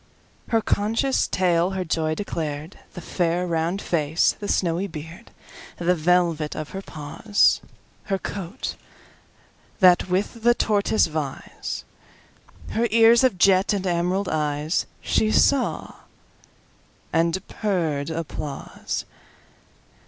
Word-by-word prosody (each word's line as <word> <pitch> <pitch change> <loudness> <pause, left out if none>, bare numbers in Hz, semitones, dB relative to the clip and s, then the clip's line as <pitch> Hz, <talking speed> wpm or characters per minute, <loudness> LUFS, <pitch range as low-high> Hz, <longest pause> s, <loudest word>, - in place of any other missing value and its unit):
Her 225 -2 +2
conscious 225 +6 +1
tail 175 -1 +2
her 185 - -2
joy 155 -1 0
declared:The 160 -1 -6
fair 175 0 0
round 170 +3 -1
face, 160 -1 +2
the 205 - -5
snowy 175 +1 0
beard, 165 +5 -9 0.5
The 175 +1 +2
velvet 170 -2 +1
of 155 -1 -5
her 195 - -6
paws, 165 +6 +1 0.4
Her 195 - 0
coat 195 +4 -5 1.0
that 185 -1 +5
with 195 +5 -1
the 240 +1 +4
tortoise 215 0 +2
vies, 155 -4 -5 0.9
Her 235 +2 +1
ears 230 +2 +6
of 255 -8 +3
jet, 190 +2 +4
and 195 -2 -2
emerald 180 +2 0
eyes—She 155 +7 -1
saw, 275 -3 +2 1.2
and 170 +3 +1
purr'd 165 -9 -1
applause. 160 -3 -5
180 Hz, 105 wpm, -24 LUFS, 160-200 Hz, 1.2 s, ears